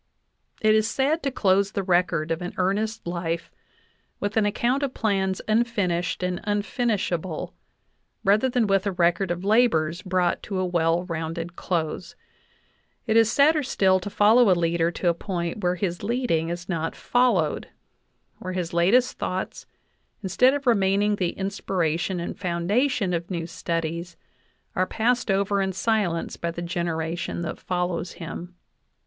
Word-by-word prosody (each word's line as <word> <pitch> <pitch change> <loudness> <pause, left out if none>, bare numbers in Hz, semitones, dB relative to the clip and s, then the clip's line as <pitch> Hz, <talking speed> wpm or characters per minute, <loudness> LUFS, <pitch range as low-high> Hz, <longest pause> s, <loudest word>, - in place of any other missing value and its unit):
It 215 -1 +5
is 215 0 +3
sad 285 +7 +1
to 280 - 0
close 200 -3 +2
the 200 - -1
record 175 -3 +1
of 165 +2 -1
an 180 - -5
earnest 210 +4 -1
life 170 -1 -3 0.7
with 205 0 -2
an 215 -2 +3
ac 205 - -1
count 255 +4 +1
of 275 -2 -2
plans 190 -3 0
unfinished 205 -7 0
and 180 -1 -2
unfinishable, 205 - -1 0.7
rather 210 +6 +3
than 245 -2 +2
with 195 0 +1
a - - +1
record 175 +1 +1
of 175 +1 -3
labors 195 -7 +2
brought 185 -2 0
to 195 - -4
a 185 - 0
well 170 -1 +1
rounded 165 0 -4
.close; 170 0 -3 0.9
it 220 -2 +1
is 225 -1 +5
sadder 300 +4 +4
still 190 -8 +2
to 185 - -6
follow 215 +3 +5
a 180 - +4
leader 170 0 +1
to 175 +1 -3
a 170 - +5
point 170 +2 -4
where 180 -1 +1
his 175 -1 -3
leading 205 -8 0
is 175 +1 -5
not 165 -3 -2
fol 245 0 +2
lowed - - -1 0.7
where 185 0 -5
his 180 -2 -3
latest 200 +9 +3
thoughts, 185 +1 -4 0.6
instead 250 +8 +3
of 285 -1 -4
remaining 205 -2 +3
the 180 -3 -2
in 195 0 -1
spiration 175 -2 -1
and 170 - -5
foundation 195 +4 0
of 170 0 -3
new 170 -3 -3
studies, 170 0 -4 0.6
are 185 0 +1
passed 240 +1 0
over 200 +1 +2
in 190 0 0
silence 190 -4 -1
by 170 - -2
the 170 +1 -5
generation 170 -1 -2
that 155 - -5
follows 180 -1 -2
him. 175 +1 -8
185 Hz, 160 wpm, -25 LUFS, 170-215 Hz, 0.9 s, It